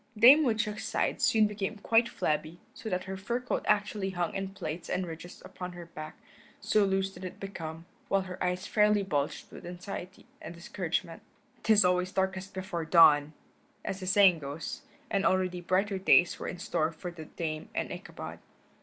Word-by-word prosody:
Dame 265 Hz, +8 st, +9 dB
Woodchuck's 220 Hz, -4 st, 0 dB
sides -, -, 0 dB
soon 220 Hz, -1 st, +5 dB
became 210 Hz, 0 st, -3 dB
quite 230 Hz, +3 st, +3 dB
flabby, 155 Hz, +2 st, -2 dB
so 225 Hz, -, -7 dB
that 180 Hz, -1 st, -1 dB
her 190 Hz, 0 st, -5 dB
fur 235 Hz, +6 st, -2 dB
coat 250 Hz, -, -2 dB
actually 205 Hz, -1 st, +1 dB
hung 175 Hz, -3 st, -2 dB
in 195 Hz, 0 st, -2 dB
plaits 175 Hz, -3 st, -6 dB
and 180 Hz, 0 st, -1 dB
ridges 165 Hz, +1 st, -9 dB
upon 180 Hz, -1 st, -7 dB
her 175 Hz, -1 st, -9 dB
back, 155 Hz, -2 st, -9 dB, 0.4 s
so 215 Hz, -, +3 dB
loose 195 Hz, 0 st, 0 dB
did 180 Hz, -, -11 dB
it 185 Hz, -, -7 dB
become, 165 Hz, -4 st, -6 dB, 0.2 s
while 195 Hz, 0 st, +2 dB
her 185 Hz, -1 st, -5 dB
eyes 180 Hz, 0 st, -1 dB
fairly 210 Hz, -1 st, +3 dB
bulged 145 Hz, -7 st, -2 dB
with -, -, -11 dB
anxiety 180 Hz, +1 st, -7 dB, 0.2 s
and 170 Hz, -, -8 dB
discouragement. 170 Hz, -1 st, -3 dB, 0.4 s
"'Tis 210 Hz, -3 st, +5 dB
always 180 Hz, 0 st, +2 dB
darkest 190 Hz, 0 st, -1 dB
before 185 Hz, -3 st, -4 dB
dawn," 155 Hz, -3 st, +6 dB, 0.5 s
as 190 Hz, -, -3 dB
the 185 Hz, -, -6 dB
saying 190 Hz, -3 st, +6 dB
goes, 145 Hz, +2 st, -6 dB, 0.3 s
and 200 Hz, -2 st, +1 dB
already 185 Hz, -1 st, +1 dB
brighter 190 Hz, +2 st, +1 dB
days 180 Hz, -2 st, +5 dB
were -, -, -4 dB
in 180 Hz, -, -5 dB
store 160 Hz, -2 st, 0 dB
for 175 Hz, +2 st, -7 dB
the 165 Hz, -2 st, -9 dB
Dame 155 Hz, -1 st, -5 dB
and -, -, -2 dB
Ichabod. -, -, -8 dB
185 Hz, 180 wpm, -30 LUFS, 170-200 Hz, 0.5 s, Dame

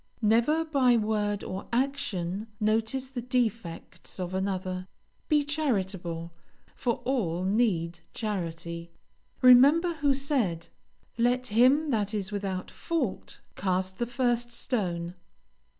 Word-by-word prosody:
Never 235 Hz, +10 st, +3 dB
by 265 Hz, -6 st, +3 dB
word 210 Hz, -2 st, 0 dB
or 190 Hz, +2 st, -5 dB
action 220 Hz, -7 st, -1 dB
notice 220 Hz, +5 st, 0 dB
the 255 Hz, -2 st, -4 dB
defects 230 Hz, -9 st, -3 dB
of 180 Hz, 0 st, -3 dB
another; 185 Hz, -1 st, -2 dB, 0.4 s
be 300 Hz, -2 st, +4 dB
charitable, 190 Hz, -, -2 dB, 0.4 s
for 235 Hz, -2 st, -2 dB
all 185 Hz, -10 st, 0 dB
need 185 Hz, -5 st, +1 dB
charity. 170 Hz, -5 st, -4 dB, 0.5 s
Remember 285 Hz, +8 st, +7 dB
who 290 Hz, -4 st, +2 dB
said, 250 Hz, -, 0 dB, 0.5 s
"Let 245 Hz, +1 st, +2 dB
him 275 Hz, +6 st, +4 dB
that 210 Hz, -2 st, 0 dB
is 200 Hz, -1 st, -3 dB
without 195 Hz, -2 st, -3 dB
fault 305 Hz, -, -3 dB
cast 185 Hz, 0 st, -1 dB
the 240 Hz, -, 0 dB
first 240 Hz, -1 st, 0 dB
stone." 175 Hz, -9 st, -2 dB
220 Hz, 110 wpm, -28 LUFS, 185-255 Hz, 0.5 s, Remember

